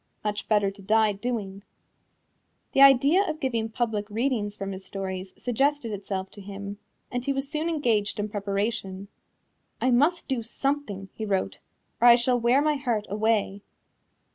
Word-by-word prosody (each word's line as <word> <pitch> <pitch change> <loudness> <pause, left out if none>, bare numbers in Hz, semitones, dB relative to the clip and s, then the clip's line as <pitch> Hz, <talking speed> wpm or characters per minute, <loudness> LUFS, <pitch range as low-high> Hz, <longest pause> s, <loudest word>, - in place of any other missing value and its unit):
Much 205 -1 -3
better 205 -2 +3
to 200 +1 -15
die 215 +2 +3
doing." 200 -2 -4 1.1
The 270 - +3
idea 275 +7 +7
of 315 -5 -4
giving 230 -5 -1
public 220 -3 -2
readings 220 -2 -1
from 195 -1 -5
his 190 0 -7
stories 190 -1 -5
suggested 270 0 0
itself 195 -1 -4
to 205 - -12
him, 200 +1 -7 0.3
and 245 -1 -2
he 275 - 0
was 270 0 -2
soon 310 +3 -2
engaged 230 -11 0
in 205 - -1
preparation. 200 -1 -3 0.7
"I 255 - +2
must 295 +8 +2
do 260 -4 -1
something," 225 -5 -3
he 220 - -6
wrote, 195 -3 -1 0.4
"or 240 - +7
I 235 - +10
shall 245 +1 +1
wear 245 +5 +3
my 300 -1 +2
heart 235 -6 -1
away." 210 -1 0
220 Hz, 160 wpm, -26 LUFS, 200-260 Hz, 1.1 s, I